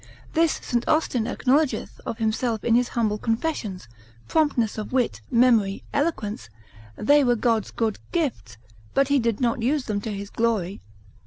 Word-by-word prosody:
This 330 Hz, -1 st, +3 dB
St. 240 Hz, -1 st, 0 dB
Austin 255 Hz, -7 st, +1 dB
acknowledgeth 270 Hz, +3 st, 0 dB
of 225 Hz, -, -3 dB
himself 225 Hz, 0 st, -1 dB
in 235 Hz, -, +2 dB
his 245 Hz, +1 st, +4 dB
humble 215 Hz, -4 st, -1 dB
confessions, 225 Hz, -, -2 dB, 0.4 s
promptness 260 Hz, -9 st, +1 dB
of 210 Hz, -, -6 dB
wit, 255 Hz, -2 st, 0 dB
memory, 230 Hz, -5 st, +3 dB
eloquence, 220 Hz, -, -2 dB, 0.5 s
they 290 Hz, +6 st, +4 dB
were 245 Hz, -2 st, +3 dB
God's 225 Hz, -2 st, +1 dB
good 220 Hz, -3 st, -2 dB
gifts, 265 Hz, -, -2 dB, 0.4 s
but 275 Hz, 0 st, +3 dB
he 280 Hz, -1 st, +4 dB
did 230 Hz, -3 st, 0 dB
not 245 Hz, 0 st, 0 dB
use 270 Hz, +4 st, +1 dB
them 205 Hz, -2 st, -2 dB
to 220 Hz, -, -4 dB
his 200 Hz, 0 st, -6 dB
glory. 210 Hz, -5 st, -1 dB
235 Hz, 155 wpm, -24 LUFS, 215-270 Hz, 0.5 s, his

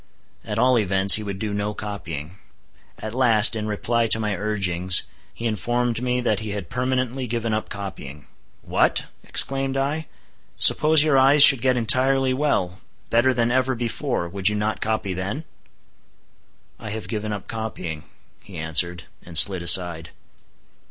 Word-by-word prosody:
At 105 Hz, -2 st, -6 dB
all 125 Hz, +1 st, +2 dB
events, 95 Hz, -1 st, +5 dB
he 110 Hz, -, +6 dB
would 100 Hz, -2 st, -7 dB
do 105 Hz, +1 st, -5 dB
no 105 Hz, +1 st, -4 dB
copying. 85 Hz, -5 st, -8 dB, 0.6 s
At 110 Hz, 0 st, -8 dB
last, 115 Hz, -3 st, +4 dB
in 110 Hz, -1 st, -5 dB
reply 115 Hz, +2 st, -2 dB
to 110 Hz, -, +4 dB
my 105 Hz, -2 st, -3 dB
urgings, 95 Hz, -4 st, +1 dB, 0.3 s
he 115 Hz, -, -10 dB
informed 120 Hz, +1 st, -3 dB
me 125 Hz, 0 st, -2 dB
that 110 Hz, -5 st, -1 dB
he 110 Hz, -2 st, -6 dB
had 100 Hz, -5 st, -8 dB
permanently 130 Hz, 0 st, -3 dB
given 115 Hz, -1 st, -4 dB
up 110 Hz, -, -4 dB
copying. 80 Hz, -8 st, -9 dB, 0.4 s
"What!" -, -, -1 dB, 0.2 s
exclaimed 135 Hz, 0 st, 0 dB
I; 145 Hz, +3 st, -3 dB, 0.5 s
"suppose 155 Hz, +1 st, +6 dB
your 145 Hz, -4 st, +2 dB
eyes 140 Hz, +2 st, +6 dB
should 135 Hz, -5 st, +8 dB
get 130 Hz, 0 st, 0 dB
entirely 130 Hz, +3 st, +2 dB
well—better 120 Hz, -1 st, -2 dB
than 120 Hz, -1 st, -1 dB
ever 130 Hz, +1 st, -1 dB
before—would 110 Hz, -6 st, -3 dB
you 105 Hz, -, -4 dB
not 105 Hz, +1 st, -4 dB
copy 110 Hz, -3 st, -3 dB
then?" 100 Hz, -, -6 dB, 1.3 s
"I -, -, -9 dB
have 110 Hz, +1 st, -7 dB
given 110 Hz, -1 st, -5 dB
up 105 Hz, -2 st, -7 dB
copying," 90 Hz, -9 st, -7 dB, 0.4 s
he 95 Hz, -4 st, -13 dB
answered, 85 Hz, +2 st, -1 dB, 0.2 s
and 85 Hz, -2 st, 0 dB
slid 95 Hz, 0 st, +7 dB
aside. 85 Hz, -2 st, +4 dB
110 Hz, 150 wpm, -21 LUFS, 95-125 Hz, 1.3 s, should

